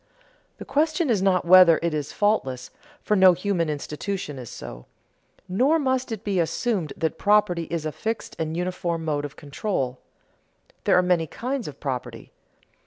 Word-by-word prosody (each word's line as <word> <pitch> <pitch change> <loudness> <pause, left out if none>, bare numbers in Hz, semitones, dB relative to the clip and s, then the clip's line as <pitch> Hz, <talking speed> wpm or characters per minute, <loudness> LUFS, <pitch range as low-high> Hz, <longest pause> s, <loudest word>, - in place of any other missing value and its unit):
The - - -9
question 310 +1 +1
is 205 -5 +2
not 185 -2 +2
whether 180 -2 +7
it 170 -2 0
is 150 -2 -3
faultless, 130 - 0 0.3
for 210 - +1
no 190 -2 +7
human 180 -2 -1
institution 150 +1 -4
is 120 -3 -8
so. - - -9 0.6
Nor 255 - +3
must 260 -4 -1
it 220 -2 -5
be 200 -4 0
assumed 170 - -1
that 160 - -2
property 200 -5 +3
is 165 -1 -4
a 155 - -1
fixed 220 +7 -4
and 160 0 -2
uniform 175 -2 -2
mode 145 -2 -1
of 145 - -8
control; 140 -4 -3 0.9
there - - +4
are 180 - +4
many 175 -3 +1
kinds 255 - -4
of 145 -2 -9
property. 130 -4 -5
180 Hz, 165 wpm, -24 LUFS, 155-210 Hz, 0.9 s, whether